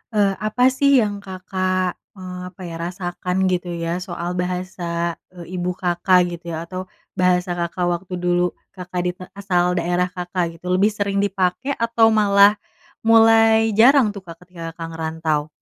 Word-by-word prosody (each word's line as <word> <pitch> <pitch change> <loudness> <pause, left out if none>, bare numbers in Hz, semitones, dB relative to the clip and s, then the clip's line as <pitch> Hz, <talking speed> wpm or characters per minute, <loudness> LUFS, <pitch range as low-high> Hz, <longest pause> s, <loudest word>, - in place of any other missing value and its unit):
eee, 200 -2 +3
apa, 215 +4 0
sih, 280 0 +4
yang 205 -1 -2
Kakak, 185 -1 -2 0.2
eee, 185 -1 -7
apa, 180 +1 -16
ya, 165 -1 -6
rasakan, 180 +1 -4
gitu, 180 0 -2
ya, 170 +1 -3
soal 175 -1 -4
bahasa, 180 -1 -3 0.2
eee, 175 +1 -7
ibu 180 0 -2
Kakak, 180 +1 +2
gitu, 170 0 -10
ya, 165 - -5
atau 185 +1 -7 0.2
bahasa 180 -1 +1
Kakak 175 +1 -2
waktu 175 +1 -3
dulu 175 0 +1 0.3
Kakak 180 -1 -6
di 180 - +1 0.3
asal 180 -2 +1
daerah 175 +1 0
Kakak, 175 -2 -3
gitu, 180 +2 -5
lebih 195 +3 +4
sering 200 -1 -2
dipakai 200 +7 -1
atau 230 -1 +3
malah 205 -1 +5 0.5
mulai 225 0 +5
jarang, 250 -1 +6
tuh, 200 -2 -8
Kak, 165 0 -11
ketika 170 -2 -9
Kakak 165 0 -7
ngerantau? 160 -2 -2
180 Hz, 155 wpm, -21 LUFS, 175-200 Hz, 0.5 s, jarang